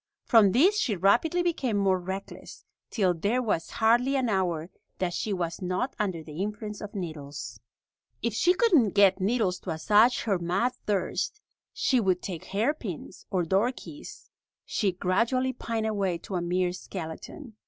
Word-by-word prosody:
From 215 Hz, -4 st, +6 dB
this 370 Hz, -, +4 dB
she 235 Hz, -, +1 dB
rapidly 245 Hz, -, +3 dB
became 270 Hz, -11 st, 0 dB
more 190 Hz, -2 st, +2 dB
reckless, 190 Hz, +2 st, -7 dB, 0.2 s
till 190 Hz, -5 st, +2 dB
there 200 Hz, +9 st, 0 dB
was 210 Hz, -9 st, -1 dB
hardly 240 Hz, +5 st, +2 dB
an 260 Hz, -3 st, +1 dB
hour 175 Hz, -4 st, -1 dB, 0.3 s
that 180 Hz, -2 st, -1 dB
she 215 Hz, -, -2 dB
was 175 Hz, -3 st, -3 dB
not 185 Hz, +8 st, -2 dB
under 185 Hz, -6 st, -1 dB
the 155 Hz, +2 st, -7 dB
influence 210 Hz, 0 st, -4 dB
of 210 Hz, 0 st, -8 dB
needles. 145 Hz, -, -6 dB, 0.6 s
If 235 Hz, -1 st, -1 dB
she 350 Hz, -, +3 dB
couldn't 330 Hz, -, +3 dB
get 200 Hz, -1 st, +5 dB
needles 195 Hz, -3 st, +1 dB
to -, -, -8 dB
assuage 210 Hz, +9 st, +4 dB
her 200 Hz, -5 st, 0 dB
mad 190 Hz, +9 st, 0 dB
thirst, 210 Hz, -, -1 dB, 0.3 s
she 260 Hz, -, +1 dB
would 185 Hz, -5 st, +1 dB
take 180 Hz, -1 st, -5 dB
hairpins 210 Hz, -, -3 dB
or 185 Hz, -2 st, 0 dB
door 195 Hz, +8 st, +2 dB
keys. 295 Hz, +3 st, -11 dB, 0.3 s
She 200 Hz, -4 st, 0 dB
gradually 235 Hz, +9 st, +1 dB
pined 230 Hz, -2 st, -3 dB
away 200 Hz, -5 st, 0 dB
to 180 Hz, -, -10 dB
a 180 Hz, -, 0 dB
mere 180 Hz, +1 st, 0 dB
skeleton. 190 Hz, -, -8 dB
200 Hz, 160 wpm, -27 LUFS, 180-235 Hz, 0.6 s, From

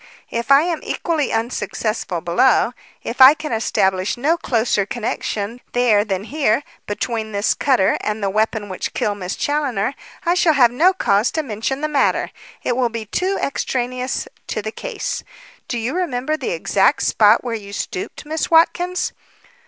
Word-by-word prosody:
If 235 Hz, +2 st, -3 dB
I 275 Hz, +2 st, +7 dB
am 335 Hz, -2 st, -1 dB
equally 320 Hz, -5 st, -1 dB
unsuccessful 225 Hz, -5 st, -2 dB
below 200 Hz, +9 st, +3 dB, 0.3 s
if 240 Hz, +3 st, -3 dB
I 265 Hz, +3 st, +10 dB
can 310 Hz, -2 st, -6 dB
establish 190 Hz, -3 st, 0 dB
no 295 Hz, +7 st, +2 dB
closer 230 Hz, -9 st, +1 dB
connection 225 Hz, +1 st, -3 dB
there 235 Hz, -4 st, +4 dB
than 195 Hz, -2 st, -2 dB
here 275 Hz, -1 st, +1 dB, 0.2 s
between 220 Hz, +1 st, -3 dB
this 200 Hz, +1 st, +2 dB
cutter 255 Hz, -9 st, +2 dB
and 210 Hz, 0 st, -3 dB
the 195 Hz, -, +1 dB
weapon 215 Hz, 0 st, 0 dB
which 185 Hz, -2 st, -5 dB
killed 205 Hz, -1 st, -1 dB
Miss 180 Hz, -1 st, -4 dB
Challoner, 280 Hz, -6 st, -1 dB, 0.3 s
I 340 Hz, -, +3 dB
shall 350 Hz, -3 st, +3 dB
have 250 Hz, -5 st, +5 dB
no 330 Hz, +10 st, +4 dB
cause 210 Hz, -, +2 dB
to 315 Hz, -, -1 dB
mention 245 Hz, +3 st, -3 dB
the 305 Hz, -, 0 dB
matter. 290 Hz, -3 st, +1 dB, 0.3 s
It 245 Hz, -, 0 dB
will 250 Hz, -1 st, +1 dB
be 230 Hz, -1 st, -5 dB
too 370 Hz, -, -1 dB
extraneous 255 Hz, -1 st, -2 dB, 0.2 s
to 215 Hz, -, -3 dB
the 215 Hz, -, -4 dB
case. -, -, -4 dB, 0.4 s
Do 240 Hz, -, -2 dB
you 235 Hz, +6 st, -2 dB
remember 305 Hz, -5 st, -1 dB
the 310 Hz, -, -4 dB
exact -, -, +2 dB
spot 215 Hz, +1 st, +4 dB
where 245 Hz, -2 st, -3 dB
you 205 Hz, -3 st, -6 dB
stooped, 200 Hz, +5 st, -5 dB
Miss 315 Hz, +1 st, -2 dB
Watkins?" 355 Hz, +2 st, +2 dB
240 Hz, 165 wpm, -20 LUFS, 215-295 Hz, 0.4 s, I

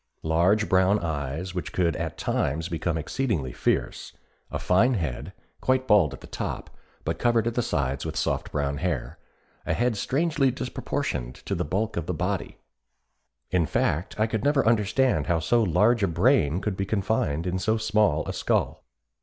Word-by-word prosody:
Large 90 Hz, +7 st, +2 dB
brown 95 Hz, +2 st, +4 dB
eyes 80 Hz, 0 st, -3 dB
which 90 Hz, -, -4 dB
could 85 Hz, -3 st, +1 dB
at -, -, -4 dB
times 80 Hz, +5 st, -1 dB
become 85 Hz, 0 st, -1 dB
exceedingly 80 Hz, -, -2 dB
fierce, -, -, -1 dB, 0.4 s
a -, -, -3 dB
fine 120 Hz, +8 st, +3 dB
head, 75 Hz, -, -3 dB, 0.3 s
quite 130 Hz, 0 st, +1 dB
bald 100 Hz, -, +5 dB
on -, -, -16 dB
the -, -, -10 dB
top -, -, -5 dB, 0.3 s
but 80 Hz, +1 st, -2 dB
covered 120 Hz, -2 st, +2 dB
at 120 Hz, -, 0 dB
the 120 Hz, -, +1 dB
sides 70 Hz, -, -1 dB
with 80 Hz, -1 st, -4 dB
soft -, -, -1 dB
brown 70 Hz, -1 st, -1 dB
hair, 80 Hz, -2 st, -3 dB, 0.4 s
a -, -, -1 dB
head 120 Hz, -1 st, +1 dB
strangely 140 Hz, +5 st, +1 dB
disproportioned 60 Hz, -, -3 dB
to -, -, -5 dB
the 90 Hz, -, 0 dB
bulk 100 Hz, +7 st, -2 dB
of 85 Hz, -2 st, -3 dB
the 90 Hz, -, -2 dB
body; 90 Hz, +3 st, -2 dB, 0.9 s
in 90 Hz, -4 st, +2 dB
fact 80 Hz, +9 st, -1 dB
I 110 Hz, -, +4 dB
could 110 Hz, -2 st, -2 dB
never 145 Hz, -1 st, +3 dB
understand 110 Hz, -, +2 dB
how 85 Hz, -, +2 dB
so 115 Hz, +10 st, +2 dB
large 110 Hz, +4 st, +3 dB
a 100 Hz, -, +3 dB
brain 85 Hz, -, +2 dB
could 105 Hz, -3 st, -2 dB
be 95 Hz, -, -2 dB
confined 95 Hz, -7 st, 0 dB
in 90 Hz, 0 st, -1 dB
so 110 Hz, +4 st, +1 dB
small 105 Hz, -7 st, +1 dB
a -, -, -3 dB
skull. -, -, 0 dB
95 Hz, 175 wpm, -26 LUFS, 80-110 Hz, 0.9 s, bald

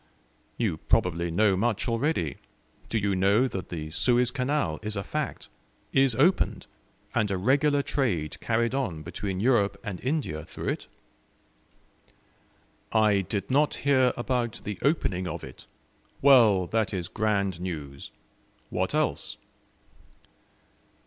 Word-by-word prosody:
"You 105 Hz, -9 st, 0 dB
probably 85 Hz, -2 st, +1 dB
know 100 Hz, +3 st, +3 dB
much 110 Hz, +4 st, 0 dB
already. 115 Hz, -, 0 dB, 0.5 s
Do 115 Hz, -, 0 dB
you 100 Hz, -2 st, 0 dB
know 100 Hz, +7 st, +3 dB
that 95 Hz, -8 st, -6 dB
the 80 Hz, -2 st, -5 dB
Suez 125 Hz, +6 st, +2 dB
Canal 125 Hz, -, -1 dB
is 105 Hz, 0 st, -5 dB
a 100 Hz, -, -2 dB
fact 150 Hz, +3 st, -4 dB, 0.5 s
is 135 Hz, -3 st, +4 dB
opened, 170 Hz, +10 st, +2 dB, 0.5 s
and 110 Hz, -3 st, +1 dB
a 95 Hz, -, -1 dB
regular 140 Hz, +7 st, +2 dB
trade 90 Hz, -, -1 dB
carried 115 Hz, +1 st, 0 dB
on 95 Hz, -, -2 dB
between 95 Hz, +3 st, -4 dB
Europe 110 Hz, -3 st, +2 dB
and 105 Hz, -5 st, -5 dB
India 130 Hz, -, -2 dB
through -, -, -5 dB
it?" -, -, -3 dB, 2.0 s
"I 105 Hz, -3 st, +4 dB
did 100 Hz, +4 st, -4 dB
not 145 Hz, +3 st, +3 dB
hear 130 Hz, -3 st, +4 dB
about 120 Hz, -1 st, -2 dB
the 105 Hz, -2 st, -5 dB
opening 100 Hz, -, 0 dB
of -, -, -5 dB
it. -, -, -11 dB, 0.5 s
Well, 115 Hz, -9 st, +6 dB
that 110 Hz, +1 st, -1 dB
is 90 Hz, -3 st, -3 dB
grand 100 Hz, -4 st, -1 dB
news! 75 Hz, -6 st, -6 dB, 0.6 s
What -, -, -1 dB
else?" -, -, -1 dB
110 Hz, 130 wpm, -27 LUFS, 95-130 Hz, 2.0 s, Well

